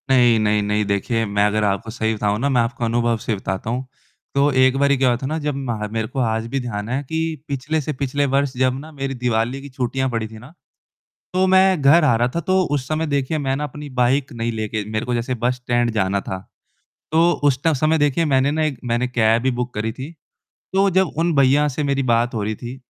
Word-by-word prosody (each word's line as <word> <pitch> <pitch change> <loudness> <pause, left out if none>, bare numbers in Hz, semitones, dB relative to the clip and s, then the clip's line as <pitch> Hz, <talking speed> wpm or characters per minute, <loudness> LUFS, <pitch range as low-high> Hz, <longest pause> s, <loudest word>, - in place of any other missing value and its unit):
नहीं, 120 -3 +5
नहीं, 105 0 +2
नहीं 105 +1 0
देखिए 110 +3 0
मैं 100 - +4
अगर 105 +1 0
आपको 100 +2 -1
सही 110 -1 -1
बताऊँ 105 0 0
ना 140 +4 0
मैं 125 -3 +3
आपको 115 0 -2
अनुभव 120 0 +1
से 110 - 0
बताता 95 +2 -4
हूँ। 125 +3 -2 0.5
तो 140 +1 +3
एक 130 +1 +4
बारी 140 0 +3
क्या 130 0 +2
हुआ 120 - +1
था - - -3
ना 155 +3 -2
जब 150 -2 -2
मह 120 -6 -3
मेरे 110 0 -2
को 130 - -5
आज 115 -2 0
भी 135 +3 -2
ध्यान 110 -4 -4
है 130 +3 -1
कि 160 +4 -3 0.3
पिछले 145 +3 -2
से 150 +2 -3
पिछले 140 +1 -1
वर्ष 140 -1 +1
जब 130 0 +1
ना 155 +3 -10
मेरी 135 -2 -4
दिवाली 120 +1 -1
की 140 - -10
छुट्टियाँ 130 0 -2
पड़ी 115 -2 -2
थी 110 0 -12
ना। 125 +8 -14 0.8
तो 185 +1 +3
मैं 190 -2 +4
घर 150 +4 +6
आ 140 - +4
रहा 120 +2 +2
था, 170 - 0
तो 185 +3 +1
उस 135 -3 -2
समय 155 +1 -1
देखिए 140 +1 -1
मैंने 135 0 -1
अपनी 150 +1 -7
बाइक 130 +3 +2
नहीं 115 0 -2
लेके 110 -1 -3
मेरे 110 0 -2
को 125 - -1
जैसे 120 +2 -1
बस 120 +1 0
स्टैंड 120 -1 0
जाना 100 -1 +1
था। 95 - -5 0.7
तो 165 +2 +4
उस 140 -3 +3
ट 160 - +4
समय 155 +4 +2
देखिए 145 +2 +2
मैंने 135 -1 +2
ना 155 +1 0
एक 145 -4 -2
मैंने 120 +1 0
कैब 115 -2 +2
भी 130 +1 +1
बुक 125 0 -3
करी 110 +1 -2
थी। 135 +7 -7 0.6
तो 195 +1 +4
जब 190 0 +2
उन 170 0 +1
भैया 140 +2 +4
से 145 +2 -3
मेरी 140 -1 0
बात 120 -1 +1
हो 110 - -1
रही 110 +2 -2
थी। 120 +4 -8
130 Hz, 240 wpm, -21 LUFS, 115-145 Hz, 0.8 s, घर